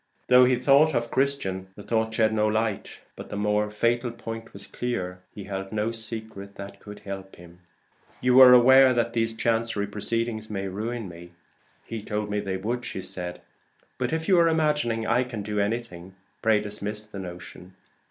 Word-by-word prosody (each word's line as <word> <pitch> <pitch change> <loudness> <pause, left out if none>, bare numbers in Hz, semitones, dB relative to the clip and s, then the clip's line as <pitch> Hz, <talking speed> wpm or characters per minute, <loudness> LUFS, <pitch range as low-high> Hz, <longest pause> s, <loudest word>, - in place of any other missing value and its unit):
Though 125 0 +8
he 125 0 +3
thought 140 +4 +4
of 120 0 -1
Christian, 130 -9 -1
the 105 - -10
thought 110 0 0
shed 110 -1 +2
no 105 -1 +2
light; 110 -1 -2
but - - -10
the - - -5
more 105 0 +1
fatal 120 +3 0
point 115 -1 -8
was - - -9
clear: 90 -7 -4
he 105 - -9
held 95 -1 -5
no 110 +1 -1
secret 110 -3 -7
that 100 0 -9
could 105 0 -11
help 95 -1 -8
him. 85 0 -15 0.6
"You 125 +1 +4
are 130 -1 +10
aware 130 +1 +7
that 120 0 0
these 115 -1 0
chancery 115 -3 0
proceedings 110 +2 -3
may 100 -2 -3
ruin 110 +3 -4
me?" 85 0 -11 0.6
"He 115 -2 -5
told 105 0 -3
me 105 - 0
they 95 -2 -3
would. 115 +6 -3 1.2
But 125 - -1
if 160 0 -2
you 185 -3 +5
are 170 - +5
imagining 150 -8 +1
I 125 +3 +2
can 115 -4 -6
do 105 0 -2
anything, 100 -4 -3 0.3
pray 110 -1 +3
dismiss 105 +1 -3
the 105 -2 -9
notion. 90 0 -10
110 Hz, 175 wpm, -26 LUFS, 100-120 Hz, 1.2 s, are